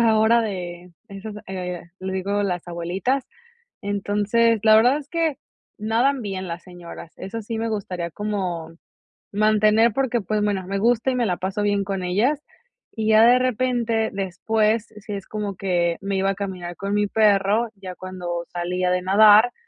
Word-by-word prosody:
ahora, 225 0 +4
de 180 -4 -5 0.2
esas, 200 +2 -8
eh, 180 -2 -4 0.2
le 190 0 -4
digo, 200 +2 -1
las 180 -3 -2
abuelitas. 185 +11 -1 0.6
Entonces, 205 +3 +1
la 215 -1 +7
verdad 245 +6 +5
es 295 -2 -9
que 330 -4 0 0.4
nadan 240 +5 +1
bien 190 -3 -4
las 170 +1 -6
señoras. 175 -2 -11
Eso 225 +4 -6
sí 225 +1 -5
me 225 +1 -2
gustaría 185 -5 -3
como 180 -6 -3 0.6
mantener 215 +2 +4
porque, 245 -3 0
pues, 210 +3 -1
bueno, 200 -3 0
me 195 +1 -2
gusta 235 +4 +2
y - - -1
me 245 - +1
la 180 -4 0
paso 195 +3 -3
bien 205 -1 +1
con 195 -1 -3
ellas, 225 +12 +1 0.5
y 220 -1 -2
ya 220 +1 +7
de 245 +2 +6
repente, 240 -2 0
después, 215 +3 0
sí 210 0 -7
es 195 -1 -5
como 210 -2 -4
que 175 -3 0
me 195 0 -2
iba 195 +1 +2
a - - -4
caminar 185 -3 -5
con 200 +3 -4
mi 205 0 +2
perro, 210 +2 +3
ya 185 -2 -8
cuando 180 -2 -5
salía 180 +1 -1
de 180 0 +1
nadar, 210 +5 +6
205 Hz, 170 wpm, -23 LUFS, 185-225 Hz, 0.6 s, la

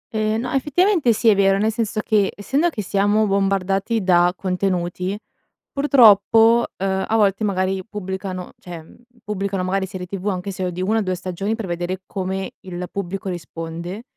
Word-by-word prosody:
Ehm, 215 +1 0
no, 250 - -4
effettivamente 300 - +2
sì 225 +1 0
è - - +7
vero, 195 0 +3
nel 215 +2 +1
senso 220 -1 -2
che, 210 -3 +2
essendo 275 +11 +1
che 215 -10 -5
siamo 205 +3 +2
bombardati 195 +2 0
da 175 -1 +4
contenuti, 180 0 -2 0.5
purtroppo, 230 -4 +5
uhm, 190 0 -1
a 225 - 0
volte 205 -1 +2
magari, 190 -1 0
pubblicano 190 -2 -5
cioè, 175 - -10
ehm, 160 -1 -12 0.3
pubblicano 200 -3 -2
magari 190 +1 -1
serie 185 -2 -6
tv 195 +2 -6
anche 190 0 -2
se 185 -1 -3
è - - -3
di 180 +1 -4
1 220 +4 +1
o - - 0
2 185 -2 -1
stagioni 185 +4 -3
per 225 -2 -5
vedere 175 +1 -3
come 190 0 -4
il 180 -1 -6
pubblico 195 0 -4
risponde 170 +3 -6
195 Hz, 175 wpm, -21 LUFS, 185-215 Hz, 0.5 s, è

